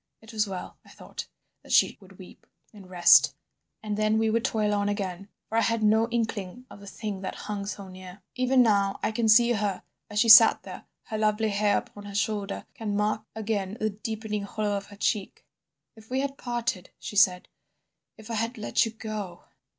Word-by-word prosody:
It 220 +1 -14
was 215 -1 +1
well, 190 -2 -7
I - - -19
thought, - - -9 0.3
that - - -13
she - - +4
would - - -17
weep - - -15 0.3
and 195 -3 -14
rest 175 -2 +6 0.5
and 210 -1 -3
then 215 0 +2
we 220 0 +1
would 230 +1 +1
toil 210 -2 0
on 205 0 0
again, 195 -1 -4 0.2
for 225 - 0
I - - +3
had 230 -1 0
no 220 +2 +3
inkling 230 -1 -3
of - - -12
the 200 - -13
thing 205 -2 -6
that 190 - -5
hung 205 -1 -4
so 200 -1 -6
near. 185 +1 -12
Even 255 0 +3
now 200 -3 +2
I - - +1
can 225 0 0
see 235 +2 +6
her 205 -4 -1 0.3
as 210 - -6
she 230 - +3
sat 225 0 +9
there, - - -10 0.2
her 215 -3 -5
lovely 215 0 +1
hair 205 0 +2
upon 205 0 -8
her 200 -1 -8
shoulder, 205 -1 -2
can 210 -2 -3
mark 210 +1 0
again 210 -2 -3
the 215 0 0
deepening 215 0 -4
hollow 205 0 -2
of 200 0 -5
her 205 - -13
cheek. 200 0 -2 0.5
"'If 220 0 -17
we 260 +1 0
had 280 0 -3
parted,' 240 -7 -3
she - - -8
said, 180 -2 +4 0.7
'if 220 +1 -10
I 225 -1 0
had 230 +2 -3
let 215 +1 +1
you - - -6
go. 210 -6 -6
215 Hz, 205 wpm, -27 LUFS, 200-225 Hz, 0.7 s, sat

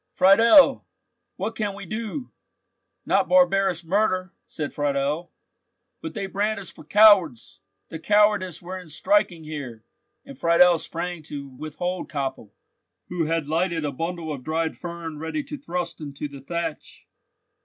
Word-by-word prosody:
"Friedel, 225 - +6 0.5
what 210 +4 -4
can 205 -2 -2
we 200 -1 -8
do?" 225 - -5 0.7
"Not - - +2
barbarous 195 -10 +3
murder," 185 0 0
said 150 -3 -5
Friedel. 145 +3 -1 0.7
"But 325 -4 -7
they 200 -2 -3
brand 205 +2 -1
us 195 - -9
for - - -14
cowards!" 205 - +4 0.3
"The 160 - -7
cowardice 205 -2 +2
were 185 +2 -6
in 180 -3 -13
striking 175 - +1
here," 140 -8 -7 0.4
and 275 -1 -12
Friedel 170 0 +5
sprang 175 +1 -5
to 140 -2 -7
withhold 155 +7 -5
Koppel, 135 -7 -4 0.6
who 175 -2 -1
had 165 -1 -1
lighted 165 +1 -1
a 145 - -1
bundle 165 +2 -4
of 135 -3 -8
dried 160 +2 -1
fern 170 -3 -7
ready 160 - -3
to 285 +2 -7
thrust 175 - -5
into 145 0 -5
the 140 -1 -11
thatch. 165 +1 -5
170 Hz, 145 wpm, -24 LUFS, 155-200 Hz, 0.7 s, Friedel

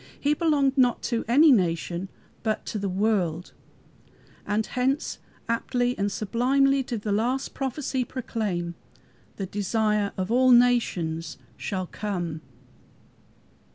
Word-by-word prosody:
He 290 +1 +2
belonged 290 -4 +2
not 250 -2 +3
to 230 - 0
any 290 +6 +6
nation, 175 -3 +1 0.3
but 215 -1 -2
to 215 - -3
the 200 -1 -2
world, 185 -4 0 0.9
and 210 +1 0
hence 265 +4 -1 0.3
aptly 245 +1 0
and 200 0 -1
sublimely 265 +7 +2
did 235 -5 -5
the 210 - -1
last 245 +6 0
prophecy 265 -1 -2
proclaim, 210 -9 -3 0.6
"The 195 - -4
desire 210 +1 0
of 190 +3 -2
all 255 +2 +4
nations 175 - +2 0.2
shall 185 -2 -3
come!" 175 -5 -4
220 Hz, 120 wpm, -26 LUFS, 190-255 Hz, 0.9 s, any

